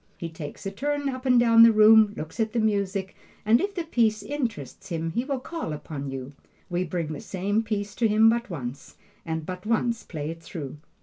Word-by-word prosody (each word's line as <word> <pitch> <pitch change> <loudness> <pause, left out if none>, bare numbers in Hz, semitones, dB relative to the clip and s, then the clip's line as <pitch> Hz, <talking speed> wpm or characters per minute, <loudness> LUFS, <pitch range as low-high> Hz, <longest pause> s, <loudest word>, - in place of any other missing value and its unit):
He 170 - -5
takes 160 0 -8
a 195 - -2
turn 285 +6 -1
up 260 0 -5
and 250 -1 +6
down 230 -1 +6
the 230 0 +9
room, 215 -1 +6
looks 160 +9 -7
at 220 -1 0
the 240 - +1
music, 200 -3 -1 0.3
and 225 +3 +5
if 400 0 -2
the 345 - -2
piece 225 -9 +1
interests 225 - -4
him 165 -1 -2
he 235 +8 -1
will 275 -1 -2
call 320 - -5
upon 145 -2 -6
you. 135 +1 -6 0.4
We 175 +1 0
bring 165 -2 -3
the 145 - -7
same 200 +3 -1
piece 205 -2 -3
to 230 - +3
him 215 +1 +5
but 235 +1 +2
once, 135 -5 -7 0.3
and 160 -1 -3
but 180 +1 -6
once 230 +1 0
play 155 -2 -5
it 165 0 -10
through. 150 -4 -7
205 Hz, 210 wpm, -26 LUFS, 165-230 Hz, 0.4 s, the